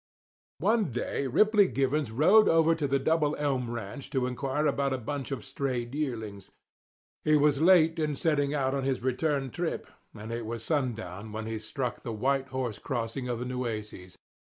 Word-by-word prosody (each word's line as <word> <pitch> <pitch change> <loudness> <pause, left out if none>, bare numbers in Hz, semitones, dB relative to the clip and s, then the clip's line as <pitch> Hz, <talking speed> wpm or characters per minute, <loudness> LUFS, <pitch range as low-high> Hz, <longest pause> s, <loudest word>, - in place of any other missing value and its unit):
One 215 +7 +2
day 125 +3 -2
Ripley 210 - +4
Givens 140 -2 0
rode 175 - +5
over 165 0 +5
to 155 -3 -1
the 140 0 +2
Double 155 +1 +1
Elm 135 -5 -1
Ranch 115 +3 -6
to 130 -2 0
inquire 135 +4 -1
about 140 -2 +1
a - - 0
bunch 135 +2 -4
of 135 -6 -4
strayed 130 -3 -3
yearlings. 110 -9 -4 0.7
He 155 - +4
was 145 -1 +3
late 165 -2 +5
in 150 -2 0
setting 145 -1 +1
out 135 -3 0
on 140 -1 -1
his 130 -2 -1
return 135 0 0
trip, 175 -1 -3 0.3
and 110 +1 -7
it 115 -1 -4
was 115 -1 -4
sundown 115 - -2
when 110 +1 -5
he 110 0 -3
struck 125 +3 -4
the 115 - -5
White 135 +5 0
Horse 130 -4 -3
Crossing 125 0 -3
of 120 - -1
the 125 - -4
Nueces. 110 -7 -5
135 Hz, 180 wpm, -29 LUFS, 120-150 Hz, 0.7 s, rode